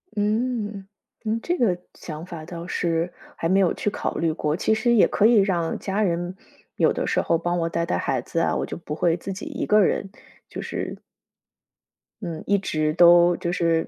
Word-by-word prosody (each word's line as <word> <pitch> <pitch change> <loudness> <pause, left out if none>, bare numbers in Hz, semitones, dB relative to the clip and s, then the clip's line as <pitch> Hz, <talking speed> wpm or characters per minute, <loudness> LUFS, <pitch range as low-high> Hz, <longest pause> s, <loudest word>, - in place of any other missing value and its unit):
嗯， 210 -2 -1 0.4
你 220 +1 0
这 350 +8 -2
个 195 -8 +2 0.2
想 155 0 -8
法 165 -4 -8
倒 170 0 -7
是 170 -1 -1 0.2
还 165 - -2
没 195 +1 +4
有 185 -3 +3
去 210 - -1
考 - - -3
虑 165 -1 +1
过， 150 -1 -1
其 220 - +1
实 235 +2 +2
也 220 - +6
可 205 - +2
以 235 +1 +6
让 185 -5 +2
家 200 +2 -2
人 175 -1 -1 0.4
有 - - +3
的 - - -2
时 - - +1
候 165 - +1
帮 175 +1 -1
我 165 - 0
带 170 0 -1
带 180 - -1
孩 130 -3 -1
子 165 - -3
啊， - - +1
我 - - -1
就 - - -6
不 150 -3 -6
会 165 0 +2
自 195 +3 -5
己 190 - -7
一 - - -3
个 210 0 +5
人， 195 +1 0
就 225 - -22
是 - - -23 1.9
嗯， 170 -4 -5
一 200 - +4
直 155 -5 -1
都 175 0 +6
就 175 - -2
是， 165 -2 +1
175 Hz, 220 characters per minute, -24 LUFS, 165-205 Hz, 1.9 s, 也